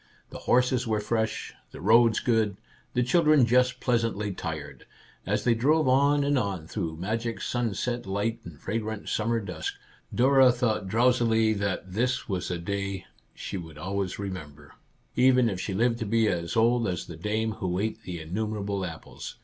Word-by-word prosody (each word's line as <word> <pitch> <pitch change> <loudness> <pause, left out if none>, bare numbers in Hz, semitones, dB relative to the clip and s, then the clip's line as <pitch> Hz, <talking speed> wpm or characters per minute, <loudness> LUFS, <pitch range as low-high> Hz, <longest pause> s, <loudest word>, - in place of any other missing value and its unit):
The - - -7
horses 125 0 +3
were 110 -1 +1
fresh, 110 +1 -2 0.2
the - - -11
roads 115 +4 +5
good, 110 -5 +1 0.4
the 125 - +3
children 150 0 +4
just 125 +1 +3
pleasantly 115 -4 0
tired. 80 -5 -6 0.4
As - - 0
they 120 - +4
drove 145 +6 +2
on 140 +2 +4
and 140 -1 +2
on 95 -7 -3
through 80 -1 -4
magic 115 +6 -2
sunset 120 -1 -2
light 105 +4 -1
and 85 -4 -11
fragrant 110 0 -4
sum 110 +1 0
mer 115 -1 +2
dusk, 90 -6 -5 0.4
Dora 130 +1 +5
thought 110 -5 -1
drowsily 115 0 +3
that 100 -3 -3
this 125 +5 0
was 95 -4 -2
a 90 - -2
day 100 +1 -3 0.3
she - - -5
would 80 -4 -9
always 95 +3 -3
remember, 75 -8 -7 0.4
even 125 -1 +5
if 95 -5 -2
she 95 - -3
lived 115 +2 +2
to 115 - -3
be 115 +1 +3
as 85 -1 -1
old 115 0 +3
as 90 -2 -3
the 85 - -9
dame 110 +6 -1
who 90 -4 -3
ate 110 +3 -2
the 90 -2 -6
innumerable 100 +3 -3
apples. 80 -3 -7
110 Hz, 170 wpm, -27 LUFS, 95-120 Hz, 0.4 s, roads